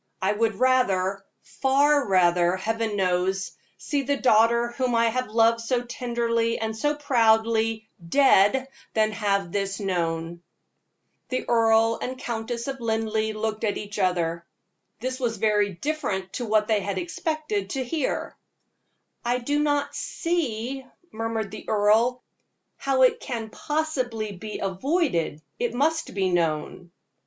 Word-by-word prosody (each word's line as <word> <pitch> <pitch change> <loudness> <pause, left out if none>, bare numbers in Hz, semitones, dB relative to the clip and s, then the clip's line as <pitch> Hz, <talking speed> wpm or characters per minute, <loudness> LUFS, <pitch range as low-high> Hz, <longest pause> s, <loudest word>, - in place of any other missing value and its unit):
I 190 +1 +1
would 220 0 0
rather 195 -6 +2 0.2
far 280 +1 +2
rather, 175 -2 +3
Heaven 225 +2 -2
knows 190 0 0 0.3
see 285 -3 -1
the 280 +1 0
daughter 235 -1 +4
whom 250 -1 -1
I 230 0 +4
have 255 +2 -2
loved 230 +1 +3
so 240 +1 0
tenderly 235 -1 -1
and 220 0 -3
so 295 +6 0
proudly, 225 -4 +2 0.2
dead, 265 0 +4 0.3
than 215 -1 +3
have 200 -4 -1
this 195 0 -2
known." 170 -3 -2 0.9
The 255 - -2
Earl 225 -1 +3
and 255 +1 -4
Countess 235 0 -4
of 270 -1 -4
Linleigh 220 -1 -1
looked 220 0 -2
at 210 -2 0
each 210 0 -6
other. 170 -3 0 0.6
This 255 +3 -3
was 235 -3 -1
very 210 -2 +2
different 190 - -3
to 245 - -3
what 215 0 +2
they 215 -2 +2
had 200 0 -3
expected 310 - -3
to 265 -2 -2
hear. 290 +2 -2 0.9
"I 240 +1 +1
do 285 +4 -1
not 290 -1 0
see," 270 -7 -2 0.3
murmured 225 -2 -3
the 215 - -9
earl, 220 +4 +3 0.5
"how 270 -1 +2
it 255 - +4
can 230 -4 -5
possibly 255 -9 -2
be 210 +3 -7
avoided 190 - -1 0.2
it 240 0 -1
must 315 +1 0
be 190 -2 +1
known." 170 +1 -1
225 Hz, 135 wpm, -25 LUFS, 200-255 Hz, 0.9 s, daughter